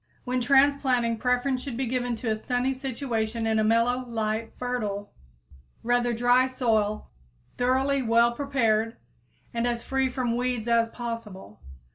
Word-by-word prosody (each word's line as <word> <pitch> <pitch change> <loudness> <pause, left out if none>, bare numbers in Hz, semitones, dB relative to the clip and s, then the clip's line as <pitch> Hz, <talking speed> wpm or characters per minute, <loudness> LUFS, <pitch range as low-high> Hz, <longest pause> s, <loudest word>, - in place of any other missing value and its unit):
When 250 0 -1
transplanting, 265 -3 +3
preference 250 +1 +1
should 260 -4 -6
be 265 - -1
given 245 0 -1
to 225 0 -3
a - - +1
sunny 245 +4 -1
situation 235 -4 -3
in 220 -1 +2
a - - +2
mellow, 230 +3 +2
light, 220 0 -2
fertile, 210 -5 -3 0.7
rather 245 0 +2
dry 245 +2 +3
soil 220 -5 0 0.5
thoroughly 265 +2 +2
well 235 0 +4
prepared 230 -4 0 0.6
and 235 +1 0
as 235 -1 -2
free 265 -1 0
from 245 -2 -1
weeds 245 -2 -1
as 230 -1 +3
possible. 225 - -7
240 Hz, 140 wpm, -26 LUFS, 225-255 Hz, 0.7 s, well